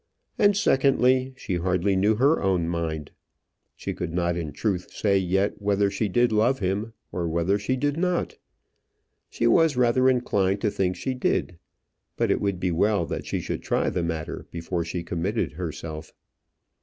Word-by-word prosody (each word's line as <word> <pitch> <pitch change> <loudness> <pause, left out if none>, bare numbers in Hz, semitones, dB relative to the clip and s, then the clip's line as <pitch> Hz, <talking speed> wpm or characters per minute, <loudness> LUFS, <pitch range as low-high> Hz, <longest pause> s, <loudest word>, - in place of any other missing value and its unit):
And 205 -1 +4
secondly, 130 -5 +3
she 90 -7 -3
hardly 90 +2 +1
knew 105 +3 +3
her 140 +8 +3
own 95 -4 +1
mind. 80 -3 -3 0.6
She - - -4
could - - -4
not 85 -1 +1
in 80 -3 -4
truth 90 +4 -2
say 100 -2 +1
yet 95 +3 0
whether 100 0 +2
she 105 +1 -1
did 120 +5 +2
love 115 +5 +3
him, 100 +3 -2 0.2
or 85 -2 -2
whether 85 +5 +1
she 130 +5 -1
did 145 +3 -1
not. 180 0 -1 0.9
She - - -2
was 145 +4 +4
rather 125 +1 +4
inclined 100 -6 +1
to 105 - +1
think 90 -2 0
she 130 - -3
did; 90 -8 -1 0.6
but - - +1
it - - +1
would 100 -3 -1
be 90 -1 0
well 100 +2 +2
that - - -5
she - - -1
should - - -4
try - - 0
the 90 - -1
matter 80 -2 -4
before 85 0 -3
she 85 +1 -4
committed 85 - -2
herself. 80 -1 -6
100 Hz, 170 wpm, -25 LUFS, 85-120 Hz, 0.9 s, And